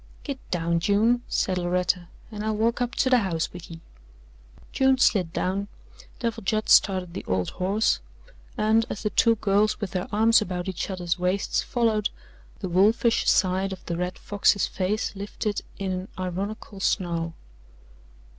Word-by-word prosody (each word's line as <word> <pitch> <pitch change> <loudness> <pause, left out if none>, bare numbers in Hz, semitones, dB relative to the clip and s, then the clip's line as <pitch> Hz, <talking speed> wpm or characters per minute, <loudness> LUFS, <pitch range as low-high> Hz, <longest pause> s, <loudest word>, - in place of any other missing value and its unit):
"Git 280 -3 -5
down, 170 -1 0
June," 220 +7 +2
said 185 -1 0
Loretta, 180 0 0 0.2
"and 210 -1 -5
I'll 215 0 0
walk 230 +3 +1
up 245 0 -1
to 260 - +2
the 250 - +6
house 170 -6 -2
with 175 -1 -10
ye." 165 -1 -10 0.9
June 265 0 +3
slid 190 -9 +3
down, 195 +4 -1 0.5
Devil 230 -2 -3
Judd 215 +2 -1
started 185 -3 +4
the - - -5
old 95 -1 -1
horse, 200 +4 +1 0.6
and 220 +1 +3
as 205 - -5
the 210 - 0
two 230 0 +4
girls, 210 0 +1
with 205 -5 -4
their 185 -1 -2
arms 225 +2 +5
about 180 -3 -3
each 190 0 -3
other's 175 -2 -2
waists, 180 +2 0
followed, 225 -4 0 0.5
the 190 - -2
wolfish 215 +6 +3
side 190 +1 +2
of 190 - -8
the 170 - -3
Red 180 +1 -3
Fox's 205 -1 +2
face 200 +3 -2
lifted 205 +1 -3 0.2
in 195 -1 -2
an 185 +1 -3
ironical 195 +3 -5
snarl. 170 -4 -1
195 Hz, 160 wpm, -25 LUFS, 180-215 Hz, 0.9 s, the